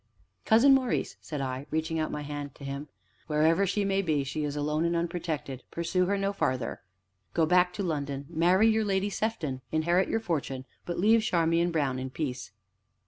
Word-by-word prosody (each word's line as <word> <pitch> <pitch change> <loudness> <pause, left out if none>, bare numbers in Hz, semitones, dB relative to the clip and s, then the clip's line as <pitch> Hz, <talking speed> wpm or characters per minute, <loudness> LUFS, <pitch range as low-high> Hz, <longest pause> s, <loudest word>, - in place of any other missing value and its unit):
"Cousin 235 +5 +6
Maurice," 260 -3 +1
said 150 -3 -5
I, 130 +1 -4
reaching 160 +1 -1
out 155 - -1
my 150 - -4
hand 145 -1 -6
to - - -13
him, 140 +2 -5 0.4
"wherever 160 +5 +3
she 200 +2 0
may 195 0 +1
be, 155 -6 +1
she 150 +3 -3
is 145 -1 -2
alone 150 +2 0
and 170 0 +1
unprotected 165 -6 -3
pursue 175 +2 0
her 200 +1 +1
no 195 0 0
farther. 130 -10 -1 0.5
Go 165 - +4
back 180 +2 +4
to 200 - -3
London, 140 -5 -2
marry 175 +6 +3
your 220 0 +3
Lady 200 0 0
Sefton, 170 -13 -2
inherit 170 +4 +2
your 225 - +1
fortune, 140 - -3 0.2
but 175 - -3
leave 220 +5 +5
Charmian 170 -3 +2
Brown 140 -6 0
in 130 0 -4
peace." 130 -5 -4
165 Hz, 185 wpm, -28 LUFS, 145-190 Hz, 0.5 s, Cousin